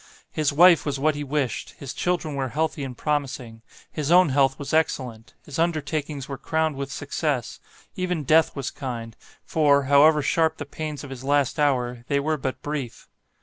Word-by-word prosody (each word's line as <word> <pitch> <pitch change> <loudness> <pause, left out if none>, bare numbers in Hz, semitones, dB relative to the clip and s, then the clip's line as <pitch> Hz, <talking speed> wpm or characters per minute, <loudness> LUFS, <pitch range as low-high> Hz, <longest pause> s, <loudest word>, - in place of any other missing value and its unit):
His 155 -1 0
wife 170 +3 +6
was 140 -2 -2
what 155 +2 +2
he 145 +1 -4
wished; 140 -4 -2
his 135 -3 -7
children 175 -4 -1
were 135 -1 -2
healthy 155 +1 -1
and 130 -3 -6
promising; 135 -6 -3 0.3
his 150 -2 -3
own 180 -1 +6
health 135 0 +2
was 140 0 -6
excellent; 125 -8 -1
his 145 +1 -6
undertakings 155 -4 -1
were 135 -2 -6
crowned 160 0 0
with 140 0 -5
success; 145 -3 -2 0.4
even 180 -4 -2
death 155 +3 +3
was 140 -3 -3
kind, 115 -4 -6 0.3
for, 145 -3 +3
however 145 +2 +5
sharp 160 +3 +1
the 145 - -5
pains 150 +1 -6
of 140 - -9
his 130 -1 -8
last 145 0 +1
hour, 125 -4 +1
they 140 -1 +1
were 155 +2 0
but 130 -2 -4
brief. 145 -5 -5
145 Hz, 180 wpm, -24 LUFS, 135-155 Hz, 0.4 s, wife